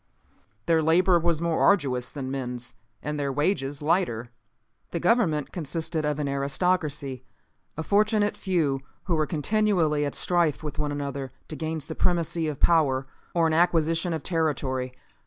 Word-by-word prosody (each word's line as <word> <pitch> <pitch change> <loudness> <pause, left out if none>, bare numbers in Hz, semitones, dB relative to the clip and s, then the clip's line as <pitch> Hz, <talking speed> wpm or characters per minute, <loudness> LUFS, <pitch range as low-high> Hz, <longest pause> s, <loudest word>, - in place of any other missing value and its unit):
Their 165 -1 +3
labor 175 +3 +4
was 170 -1 0
more 170 -1 +1
arduous 135 -10 +3
than 130 -3 -5
men's, 125 -2 -3 0.3
and 150 0 -3
their 140 -1 -1
wages 145 -1 -1
lighter. 145 -9 0 0.6
"The 170 - -3
government 175 - +2
consisted 160 -1 -2
of 150 -1 0
an 150 -1 -1
aristocracy, 140 -1 -1 0.5
a 160 - -2
fortunate 210 +2 +2
few, 160 -8 0 0.2
who 180 - -1
were 155 -1 +1
continually 170 -3 +1
at 145 - -2
strife 170 -4 +1
with 150 0 -5
one 150 -1 -1
another 140 -2 -4 0.2
to 155 - -5
gain 160 0 -3
supremacy 170 +1 0
of 150 -3 -4
power, 140 -6 +3 0.3
or 170 -1 +4
an 160 - +2
acquisition 165 0 +2
of 160 -3 -3
territory. 140 -7 -1
155 Hz, 150 wpm, -26 LUFS, 140-170 Hz, 0.6 s, labor